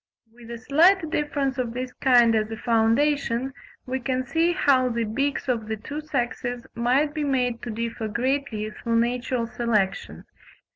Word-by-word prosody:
With 235 -1 -14
a 235 - -5
slight 320 +7 +3
difference 280 -3 -1
of 240 -2 -2
this 255 0 -4
kind 240 -4 +4
as 215 -1 +1
a 225 - -5
foundation, 245 +3 +1 0.3
we 260 +1 -2
can 255 +1 -2
see 325 +6 +2
how 275 -8 +3
the 235 -1 -1
beaks 275 +7 -2
of 230 -4 -1
the 220 0 -3
two 290 +8 -6
sexes 245 -4 -3
might 260 +6 +1
be 305 -1 -2
made 250 -4 0
to 240 - -6
differ 230 0 -3
greatly 235 -2 -2
through 230 +2 -3
natural 240 +1 0
selection. 225 -5 -1
245 Hz, 160 wpm, -24 LUFS, 230-275 Hz, 0.3 s, kind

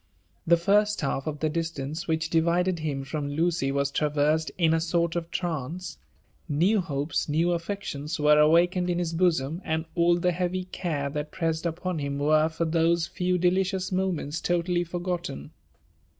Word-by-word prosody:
The 170 +1 +6
first 205 +4 +2
half 135 -1 -2
of 150 -2 -4
the 155 - +1
distance 160 -1 -4
which 160 -1 -1
divided 170 +2 +2
hm 145 -3 -3
bom 145 -2 -2
Ukcj 160 -2 0
waa 140 0 +1
traversed 150 +2 +1
in 165 -3 +3
a 165 - +2
sort 170 0 0
of 170 -1 -3
trance: 170 0 -4 0.5
new 180 +8 +3
hopes, 145 -1 -2
new 165 +4 +2
Atteclion$, 170 -4 -3
were 150 0 +5
awakened 175 +4 +4
in 175 - 0
his 170 -2 -2
bosom, 165 -2 +1
aad 160 +1 -1
all 170 0 +3
the 180 +1 +1
heavy 180 +1 -2
<^are 155 -6 -3
ihat 150 0 -3
pressed 165 -2 -1
upon 175 +1 -3
him 140 -1 -3
were 155 +2 +3
for 165 +1 -2
those 165 +1 +2
few 180 +1 -1
delieious 185 +1 +1
moments 175 -5 -1
totally 175 0 0
fer^ 175 +1 -5
gptte^. 175 - -4
165 Hz, 165 wpm, -26 LUFS, 150-175 Hz, 0.5 s, The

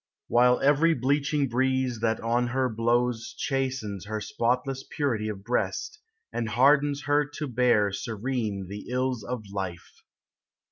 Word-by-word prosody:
L - - -7
While 125 +1 +5
every 150 +4 +4
bleaching 140 +2 +1
breeze 130 -1 0
that 115 0 0
on 120 +2 +1
her 130 +1 0
blows 120 +1 0
Chastens 130 - -2
her 110 0 -2
spotless 125 +5 -1
purity 115 -8 -1
of 100 -2 -6
breast, 125 - -2 0.3
And 115 -2 -2
hardens 140 +4 +3
her 145 0 +3
to 150 - -3
bear 120 -5 +3
Serene 110 -2 -3
the 100 +2 -8
ills 125 -1 -1
of 125 -3 -4
life. 95 -3 -6
125 Hz, 140 wpm, -27 LUFS, 110-135 Hz, 0.3 s, While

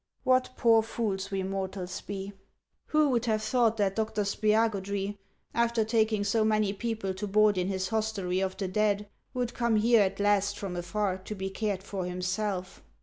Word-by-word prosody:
What 255 0 +3
poor 225 -1 +5
fools 205 -4 -3
we 195 -1 -2
mortals 190 -1 -4
be! 195 0 -6 0.5
Who 305 -1 +3
would 240 -2 +1
ever 225 - +2
have 215 0 -1
thought 225 0 +2
that 195 -2 +1
Dr. 220 -1 0
Spiagudry, 205 -1 0 0.3
after 235 -1 +2
taking 220 -2 +2
so 220 +2 +2
many 215 -2 +2
people 220 -3 -3
to 195 +3 -4
board 210 +1 +4
in 180 0 0
his 190 -1 -2
hostelry 215 -4 -1
of 190 0 -2
the 195 -1 -2
dead, 205 +1 +1 0.3
would 245 -1 -1
come 235 -2 +1
here 225 +1 +5
at 195 0 0
last 205 0 +2
from 195 -3 -5
afar 185 +2 -1
to 200 +3 -7
be 190 0 -4
cared 195 -1 -2
for 195 -2 -4
himself 185 +1 -3
205 Hz, 180 wpm, -29 LUFS, 190-220 Hz, 0.5 s, poor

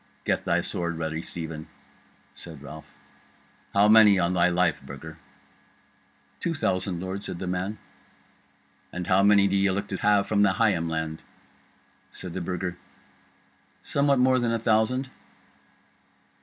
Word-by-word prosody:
"Get - - 0
thy - - +2
sword 85 -1 -3
ready, 80 0 -3
Stephen," 80 -2 -7 0.7
said 80 -4 -10
Ralph. 75 +2 -11 0.8
"How 100 +1 +4
many, 105 -2 +7
on 90 0 +1
thy 90 0 +3
life, 90 0 +1
Burger?" - - -10 1.2
"Two 170 - -2
thousand, 95 - -1
lord," 95 +2 -5
said - - -6
the 95 - -5
man. 90 +4 -3 1.1
"And 90 0 -5
how 95 +2 +3
many 100 0 +5
do 100 - 0
ye 100 0 +3
look 100 +2 -2
to 95 - -3
have 105 0 +3
from 105 -1 +2
Higham 95 -4 +2
land?" 80 0 -3 0.9
Said 90 -2 -9
the 95 - -4
Burger, 90 0 -4 1.0
"Somewhat 140 -1 +2
more 130 0 +4
than 120 -1 0
a 115 - +1
thousand." 115 +4 +1
95 Hz, 140 wpm, -26 LUFS, 85-105 Hz, 1.2 s, many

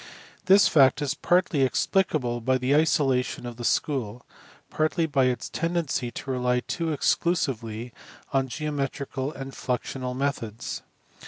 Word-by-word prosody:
This 195 +2 +7
fact 135 -3 +5
is 140 -1 0
partly 175 -1 +2
explicable 130 -3 +1
by 130 +3 +2
the 130 +3 +1
isolation 140 -6 +1
of 120 -1 -7
the 120 - -6
school, 120 -3 -1 0.5
partly 155 +2 +1
by 140 -4 +2
its 125 -1 -1
tendency 165 -7 -1
to 135 - -6
rely 125 -1 +1
too 165 +3 -3
exclusively 125 -8 -1 0.4
on 135 -1 +2
geometrical 140 0 -3
and 135 -2 -7
fiuxioiial 125 0 -3
methods. 125 -5 -3
135 Hz, 130 wpm, -26 LUFS, 125-155 Hz, 0.5 s, This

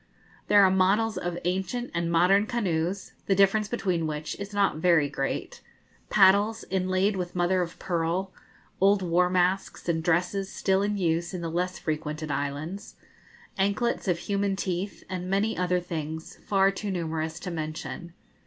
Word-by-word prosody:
There 205 -1 +6
are 190 - +5
models 200 +4 +2
of 175 -1 -3
ancient 190 +7 -2
and 170 0 -1
modern 190 +5 +4
canoes 190 -5 -1 0.2
the 195 - +3
difference 200 +2 +3
between 185 -8 -1
which 150 0 -4
is 200 0 -6
not 200 -6 +1
very 160 -3 +4
great, 135 -1 -4 0.5
paddles, 205 +3 +4
inlaid 185 +2 +1
with 180 -1 -4
mother 180 +1 +2
of 170 -1 -4
pearl, 175 +2 -1 0.5
old 195 0 +4
war 180 +1 +2
masks, 185 +1 0
and 165 -1 +1
dresses 180 +3 0
still 190 0 +1
in 205 0 0
use 170 0 0
in 180 - -4
the 165 -1 -3
less 180 +2 -1
frequented 155 -1 -3
islands, 145 +7 -4 0.6
anklets 200 +3 0
of 180 -2 +2
human 200 +2 -1
teeth, 190 +1 -3
and 185 -1 -4
many 200 +3 +1
other 180 0 +1
things 160 -2 -5
far 195 -1 +4
too 200 +1 -5
numerous 160 -2 -3
to 180 - -5
mention. 165 +2 -5
180 Hz, 155 wpm, -27 LUFS, 170-195 Hz, 0.6 s, There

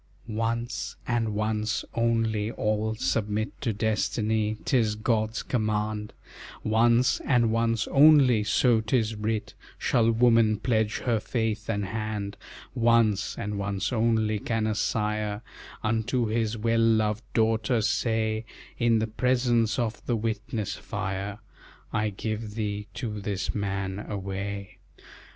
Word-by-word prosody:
"Once, 115 +2 -2
and 115 -2 0
once 110 0 -1
only, 115 -2 +1
all 110 +1 0
submit 105 +2 -1
To 120 - 0
Destiny, 110 0 0
'tis 110 -5 +2
God's 110 0 0
command; 105 -2 -1 0.5
Once, 115 +3 +3
and 120 -4 +2
once 115 -1 +1
only, 135 -6 +6
so 115 +2 +3
'tis 110 0 +1
writ, 105 0 -2 0.2
Shall 115 -1 +2
woman 115 -2 +4
pledge 110 -2 0
her 115 -3 +1
faith 110 -1 -2
and 105 -2 0
hand; 105 -1 -3 0.4
Once, 115 -3 +2
and 105 0 -3
once 100 +3 -2
only, 110 -2 +2
can 115 +1 -1
a 110 - +1
sire 105 0 -1 0.4
Unto 115 +3 0
his 110 0 -1
well 115 +1 +1
loved 110 -2 +2
daughter 115 +2 +2
say, 110 0 0 0.4
In 115 -1 +3 0.2
presence 120 -3 +2
of 120 -3 -2
the 120 - +2
witness 110 -1 -2
fire, 100 -1 -4 0.6
I 105 0 +1
give 110 +1 -4
thee 105 -2 -3
to 105 -5 -4
this 100 -1 -2
man 100 -1 -2
away. 100 0 -5
110 Hz, 120 wpm, -27 LUFS, 105-115 Hz, 0.6 s, only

